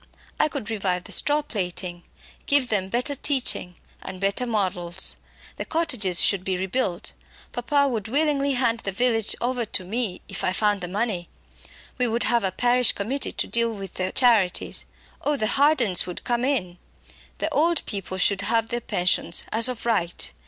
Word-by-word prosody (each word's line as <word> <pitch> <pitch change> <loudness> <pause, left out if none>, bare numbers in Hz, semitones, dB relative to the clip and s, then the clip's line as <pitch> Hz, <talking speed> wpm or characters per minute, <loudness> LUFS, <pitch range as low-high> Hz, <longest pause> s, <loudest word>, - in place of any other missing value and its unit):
"I - - +4
could 270 -6 -5
revive 185 -4 -1
the - - -11
straw 295 +1 +3
plaiting; 180 -6 -4 0.5
give 280 -3 +4
them 190 -3 0
better 250 +7 0
teaching 260 -10 0 0.3
and 185 - -7
better 200 +6 0
models. 185 -5 0 0.4
The - - -3
cottages 250 - +1
should 195 -3 +3
be 185 -1 -1
rebuilt. 190 -1 -1 0.4
Papa 280 +4 +1
would 225 -5 -3
willingly 280 +1 +1
hand 235 -3 +2
the 195 - -3
village 225 +1 +2
over 245 0 0
to 210 -3 -2
me 215 -1 -2
if - - -5
I 185 - +1
found 205 -1 +1
the 180 - -4
money! 195 -2 -2 0.7
We 250 - +2
would 230 +1 0
have 235 -2 +3
a 190 - 0
parish 245 +4 +3
committee 255 +8 -2
to - - -1
deal 235 0 +1
with 195 -4 -8
the 185 0 -2
charities 225 -8 +2 0.4
oh! 295 0 0
the 220 - 0
Hardens 255 - +3
would 180 - -5
come 240 -1 0
in. 195 -11 -1 0.6
The - - -2
old 335 +3 +2
people 195 -2 -5
should 195 +1 +1
have 225 +2 +1
their 240 0 -2
pensions 175 -4 +1
as 225 +2 +4
of 245 -2 -6
right. 175 -7 0
225 Hz, 175 wpm, -24 LUFS, 190-250 Hz, 0.7 s, I